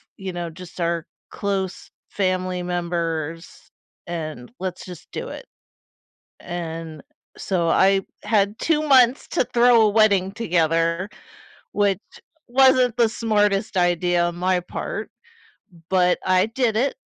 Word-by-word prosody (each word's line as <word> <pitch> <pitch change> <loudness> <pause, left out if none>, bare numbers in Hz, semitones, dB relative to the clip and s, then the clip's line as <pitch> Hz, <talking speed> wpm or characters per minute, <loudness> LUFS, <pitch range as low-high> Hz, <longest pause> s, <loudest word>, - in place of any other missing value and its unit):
you 190 -1 -6
know, 175 -1 -4
just 180 +2 -12
our 170 -1 -1 0.3
close 195 -2 -3 0.2
family 185 -2 -1
members, 170 -2 -4 0.4
and 155 -7 -6
let's 185 -1 -5
just 180 -3 -11
do - - -5
it." - - -8 1.0
And 165 -3 -6 0.4
so 175 -4 -1
I 195 +3 +4 0.2
had 210 +1 +1
2 315 -2 +1
months 255 -2 +5
to - - +1
throw 240 -1 +6
a 215 - +4
wedding 200 -3 +3
together, 170 -2 0 0.6
which 200 -2 +1 0.5
wasn't 255 -1 +4
the 235 -2 +4
smartest 210 -3 0
idea 175 -1 +2
on 175 0 -2
my 180 0 +1
part, - - -5 0.8
but 180 -1 +3
I 185 +1 +3
did 225 -1 0
it. 270 - +1
185 Hz, 125 wpm, -22 LUFS, 170-215 Hz, 1.0 s, throw